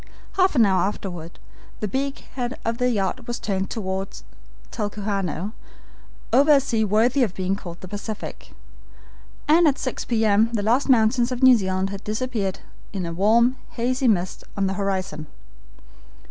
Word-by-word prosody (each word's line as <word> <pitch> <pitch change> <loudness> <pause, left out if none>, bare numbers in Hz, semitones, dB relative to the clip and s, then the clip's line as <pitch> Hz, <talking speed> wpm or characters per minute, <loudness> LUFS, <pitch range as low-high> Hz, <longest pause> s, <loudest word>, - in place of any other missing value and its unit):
Half 375 -3 +2
an 235 -4 +6
hour 190 -2 +3
afterward 180 -4 -4 0.4
the 210 - -2
beak 270 +6 -3
head 245 -1 -3
of 230 +1 -1
the 250 0 +2
yacht 225 +2 -1
was 240 0 -2
turned 195 -2 -2
toward 190 -2 -3 0.6
Talcahuano, 205 -3 -3 0.8
over 290 +3 +6
a 280 - +7
sea 235 -5 0
worthy 225 +6 +3
of 215 -7 +1
being 190 +1 0
called 175 -3 -9
the 185 - -8
Pacific, 205 +2 -7 0.9
and 325 +2 +6
at 285 -2 +2
six 255 - -3
P. 225 -2 +1
M. 215 +2 +4
the 210 -3 0
last 245 +7 +2
mountains 240 0 +4
of 250 +1 -3
New 260 -1 +9
Zealand 190 -2 -1
had 200 0 -7
disappeared 215 -3 -2 0.3
in 175 -4 -4
warm, 235 +7 +4 0.2
hazy 255 +3 +1
mist 185 -5 0
on 200 - +1
the 190 - 0
horizon. 190 -5 -2
215 Hz, 160 wpm, -23 LUFS, 195-250 Hz, 0.9 s, New